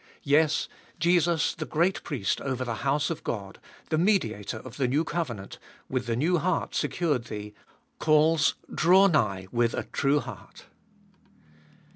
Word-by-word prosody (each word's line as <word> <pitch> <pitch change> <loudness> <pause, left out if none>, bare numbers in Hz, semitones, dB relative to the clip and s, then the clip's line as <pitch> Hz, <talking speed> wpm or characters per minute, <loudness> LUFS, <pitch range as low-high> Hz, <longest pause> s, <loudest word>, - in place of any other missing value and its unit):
Yes, 150 +2 +3 0.3
Jesus, 170 -2 +2
the 155 - -5
great 170 +5 +1
Priest 125 - -2
over 130 -2 -2
the 115 -2 -3
house 145 +3 +1
of 165 - -5
God, 100 -4 -5 0.3
the 155 - +1
Mediator 115 - 0
of - - -10
the 135 -3 +1
new 145 +6 +1
covenant, 125 - -4 0.3
with 130 -2 -2
the 115 - 0
new 165 +8 +2
heart 180 +1 -1
secured 150 -9 0
thee, 105 -2 -7 0.5
calls, 155 -3 +3 0.2
Draw 185 +4 +5
nigh 100 - 0
with 120 -1 +1
a - - -2
true 140 +1 +1
heart. 125 -8 -10
145 Hz, 145 wpm, -27 LUFS, 120-165 Hz, 0.5 s, Draw